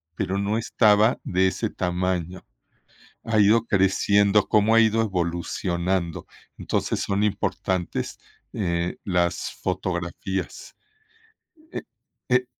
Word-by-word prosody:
pero 95 +1 -2
no 100 +2 0
estaba 110 0 +3
de 95 +1 +2
ese - - -2
tamaño, 90 0 -2 0.8
ha 110 -1 0
ido 110 +3 +5
creciendo, 100 +1 +3
cómo 110 +1 +3
ha 115 - +7
ido 110 0 +3
evolucionando", 85 -1 -2 0.3
entonces, - - -1
son 100 +1 -1
importantes, 95 -3 -2 0.3
eh, 85 -3 -2
las 90 -2 0
fotografías, 90 0 -4 1.0
eh, - - -5 0.5
eh 125 0 +3
95 Hz, 100 wpm, -24 LUFS, 90-105 Hz, 1.0 s, ha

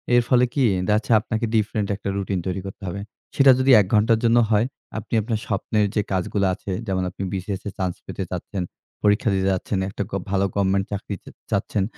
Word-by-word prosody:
এর 120 - +6
ফলে 125 0 +5
কি? 140 - +2 0.2
দেখা 105 - +4
যাচ্ছে 110 - -3
আপনাকে 110 +1 -2
ডিফারেন্ট 105 -1 +1
একটা 100 0 -5
রুটিন 100 -1 -1
তৈরি 95 +1 -2
করতে 95 - -10
হবে। 95 +3 -4 0.3
সেটা 135 -1 +7
যদি 130 +1 +4
১ - - -1
ঘন্টার 110 +1 +4
জন্য 115 0 +4
হয়, 110 0 +3 0.3
আপনি 110 - -7
আপনার 110 0 -2
স্বপ্নের 105 +1 +1
যে 105 - +3
কাজগুলা 95 +1 0
আছে 100 - -7 0.2
যেমন 95 -1 0
আপনি 95 +2 -7
বিসিএস 95 0 -3
এর 100 - -5
চান্স 95 -2 -1
পেতে 95 - -4
যাচ্ছেন, 90 +1 -4 0.4
পরীক্ষা 105 +2 +3
দিতে 95 0 +1
যাচ্ছেন, 95 +2 -2
একটা 100 - -3
গব 100 - -2
ভালো 100 0 +2
গভর্নমেন্ট 95 -1 +2
চাকরিতে 100 -1 -5
চা - - -30 0.2
চাচ্ছেন। 100 - 0
100 Hz, 205 wpm, -23 LUFS, 95-110 Hz, 0.4 s, সেটা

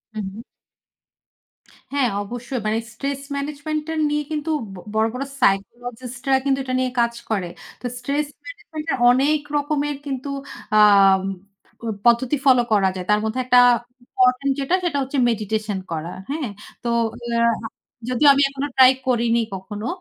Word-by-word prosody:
হু। 205 +1 -5 1.5
হ্যাঁ, 270 -4 +2
অবশ্যই। 240 +3 -5
মানে 215 +1 +1 0.2
স্ট্রেস 275 +3 -4
ম্যানেজমেন্টটা 300 +2 -3 0.2
নিয়ে 295 0 0
কিন্তু 300 +1 -3 0.2
ব - - -10 0.2
বড়, 220 +1 +2
বড় 255 +2 -3 0.2
সাইকোলজিস্টরা 245 +6 0
কিন্তু 270 -1 +2
এটা 255 -1 -4
নিয়ে 255 -1 0
কাজ 235 0 +2 0.2
করে। 195 -5 -1 0.3
তো - - -9
স্ট্রেস 280 +4 -1 0.2
ম্যানেজমেন্ট 320 -11 -8
এর - - 0
অনেক 280 +5 +3 0.2
রকমের 290 0 -1
কিন্তু 275 0 -4 0.5
আম 195 -2 +6 0.6
প - - -33 0.2
পদ্ধতি 240 +4 +3
ফলো 255 -2 +6
করা 195 -2 +4
যায়। 180 - -5
তার 210 - +4
মধ্যে 220 +4 -2
একটা 250 0 +6 0.5
ইম্পোর্টেন্ট 255 +2 +2
যেটা, 275 +7 +1
সেটা 335 -5 0
হচ্ছে 270 +1 -3
মেডিটেশন 215 -2 -2
করা। 165 +2 -4 0.2
হ্যাঁ? 290 -4 -2 0.3
তো 240 - -1 0.4
আ - - -4 0.8
যদিও 255 +4 +3
আমি 275 - +2
এখনো 275 +1 -3
ট্রাই 260 -1 +9 0.2
করিনি 235 -1 +2
কখনো। 205 +3 -6
250 Hz, 145 wpm, -22 LUFS, 220-280 Hz, 1.5 s, ট্রাই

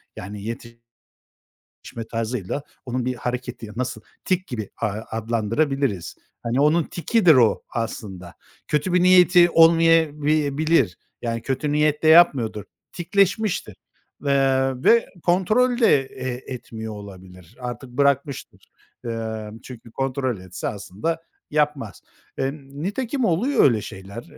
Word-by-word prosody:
Yani, 100 +2 -8
yetişme 115 +1 -9 1.1
tarzıyla 115 +2 -3 0.2
onun 125 0 -2
bir 125 0 -1
hareketi, 125 -2 -5
nasıl, 125 -3 -3 0.2
tik 185 0 0
gibi, 110 -6 -5
ııı, 110 0 -2
adlandırabiliriz. 115 - -1 0.3
Hani, 120 +3 0
onun 155 +3 +4
tikidir 180 0 +3
o, 120 -4 +3
aslında. 95 -6 -5 0.3
Kötü 155 +4 0
bir 180 - +3
niyeti 180 -1 +6
olmayabi 160 -3 +4
bilir. 155 - +2 0.2
Yani, 115 -1 -3
kötü 140 +2 -2
niyetle 150 +1 +2
yapmıyordur. 135 - +5 0.3
Tikleşmiştir. 195 +3 0 0.5
Iıı 135 -1 +1
ve 235 0 +5 0.2
kontrol 215 +8 +2
de 225 - +5
e 130 -1 -7 0.3
etmiyor 110 -3 -7
olabilir. 95 -1 -12
Artık 125 +1 -6
bırakmıştır. 140 +1 -1 0.3
Imm, 110 -2 -5
çünkü 120 -2 -11
kontrol 130 -2 -2
etse, 90 0 -5
aslında 105 - -4 0.3
yapmaz. 145 - -1 0.4
Imm, 135 +1 -4
nitekim 245 - -2
oluyor 225 - +2
öyle 115 -6 +4
şeyler. 100 +5 -9
135 Hz, 115 wpm, -23 LUFS, 115-160 Hz, 1.1 s, niyeti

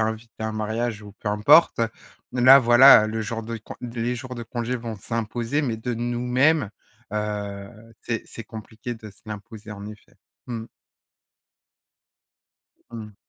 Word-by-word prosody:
invitée 110 0 -5
à - - 0
un 110 - -3
mariage 110 +1 -2
ou 105 -1 -11
peu 105 - -4
importe. 115 +9 +5 0.5
Là 130 +2 +8
voilà, 120 -2 +8
le 110 +1 -3
jour 115 +1 -4
de 115 +1 -5
con 110 - -10
d 120 -1 -6
les 120 +2 0
jours 125 +1 -7
de 120 - -5
congés 120 +1 -3
vont 115 -2 -6
s'imposer, 115 +6 -2
mais 120 -7 -2
de 120 +2 -4
nous-mêmes, 125 +2 +1 0.4
heu, 100 -2 -4 0.3
c'est 115 -2 -3
c'est 115 - -9
compliqué 110 +2 -8
de 110 -2 -11
se 100 - -22
l'imposer 110 0 -9
en 100 0 -9
effet. 105 0 -12 0.3
Mmh. 115 -2 -5 2.2
Mmh. 110 -3 -9
115 Hz, 155 wpm, -24 LUFS, 110-120 Hz, 2.2 s, Là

